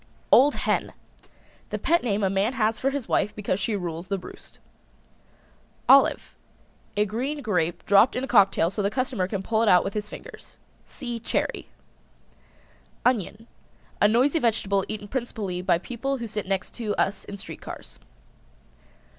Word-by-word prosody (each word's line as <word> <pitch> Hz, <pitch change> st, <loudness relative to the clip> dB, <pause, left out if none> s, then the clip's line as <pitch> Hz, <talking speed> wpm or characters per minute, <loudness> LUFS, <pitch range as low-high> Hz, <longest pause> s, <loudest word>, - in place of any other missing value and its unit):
OLD 285 Hz, +3 st, +6 dB
HEN. -, -, -1 dB, 0.8 s
The -, -, -2 dB
pet 340 Hz, +1 st, +2 dB
name 210 Hz, -3 st, -1 dB
a 190 Hz, -, +3 dB
man 195 Hz, +5 st, +1 dB
has 220 Hz, -3 st, 0 dB
for 270 Hz, -, +1 dB
his 275 Hz, -3 st, -4 dB
wife 210 Hz, +1 st, 0 dB
because 200 Hz, -2 st, -2 dB
she 210 Hz, +2 st, -1 dB
rules 170 Hz, -2 st, -4 dB
the 195 Hz, -, -1 dB
roost. 180 Hz, -, -12 dB, 1.3 s
OLIVE. 275 Hz, 0 st, +5 dB, 0.6 s
A 210 Hz, -, +3 dB
green 265 Hz, +8 st, -3 dB
grape 175 Hz, -6 st, -1 dB
dropped 205 Hz, +5 st, +5 dB
in 250 Hz, -, -2 dB
a -, -, -3 dB
cocktail 195 Hz, -7 st, +4 dB
so 205 Hz, -, -2 dB
the 200 Hz, -, +1 dB
customer 250 Hz, -5 st, -1 dB
can 195 Hz, -1 st, -4 dB
pull 220 Hz, +2 st, +1 dB
it 225 Hz, -, +3 dB
out 180 Hz, -1 st, +6 dB
with 195 Hz, -, -4 dB
his 210 Hz, 0 st, -4 dB
fingers. -, -, -11 dB, 0.3 s
See 240 Hz, -4 st, -6 dB
Cherry. 230 Hz, -, -2 dB, 1.4 s
ONION. 225 Hz, -2 st, 0 dB, 0.6 s
A 205 Hz, -, +7 dB
noisy 255 Hz, +8 st, +3 dB
vegetable 200 Hz, -5 st, +1 dB
eaten 210 Hz, -1 st, -5 dB
principally 210 Hz, -7 st, -3 dB
by 180 Hz, -, +2 dB
people 255 Hz, +8 st, -3 dB
who 235 Hz, -, -5 dB
sit 210 Hz, -3 st, -4 dB
next 195 Hz, -1 st, -2 dB
to 220 Hz, -4 st, -2 dB
us 195 Hz, -, 0 dB
in 200 Hz, -, -7 dB
street -, -, -9 dB
cars. -, -, -9 dB
210 Hz, 165 wpm, -25 LUFS, 195-245 Hz, 1.4 s, A